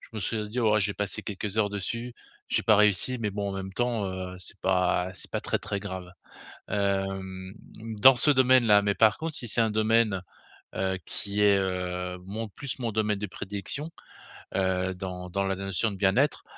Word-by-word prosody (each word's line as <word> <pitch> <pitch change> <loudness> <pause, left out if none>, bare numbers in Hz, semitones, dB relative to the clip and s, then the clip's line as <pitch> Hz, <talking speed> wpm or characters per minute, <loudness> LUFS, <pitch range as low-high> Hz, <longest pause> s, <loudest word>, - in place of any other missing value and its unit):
je - - -16
me 110 - -3
serais 105 +1 -2
dit: 120 - -5
«Oh, 110 -2 +3
j'ai 100 0 +1
passé 105 -1 -2
quelques 105 0 -4
heures 105 -2 +3
dessus, 115 +4 -4 0.3
j'ai - - +1
pas 110 - +6
réussi, 105 +4 +3
mais 105 -2 -1
bon 100 0 -3
en - - -5
même 95 0 -5
temps, 115 -2 -1
heu, 95 -1 -5
c'est - - -10
pas 90 -1 +1
c'est - - -10
pas - - -1
très, - - -1
très 100 - -3
grave.», 95 -3 -7 0.6
hem 95 -1 -2 0.5
dans 135 -1 +9
ce 145 +5 +8
domaine 130 -2 +5
là. 105 -2 +6
Mais 100 0 0
par 110 -1 +4
contre 160 -1 -3
si 125 - -4
c'est 115 - +2
un 110 - +2
domaine, 110 -2 +2 0.5
heu, 95 0 -1
qui 100 0 -2
est, 100 -1 +5
heu, 90 -1 -2
mon 110 +4 -5
plus 140 +7 -5
mon 120 -3 -2
domaine 105 -1 0
de 105 - -3
prédilection, 100 - -6 0.7
heu, 95 -1 0
dans 90 -1 -6
dans 100 +2 -1
la 95 0 -1
notion 95 +3 -1
de 100 - -6
bien-être, 105 +10 +2
100 Hz, 200 wpm, -27 LUFS, 95-110 Hz, 0.7 s, dans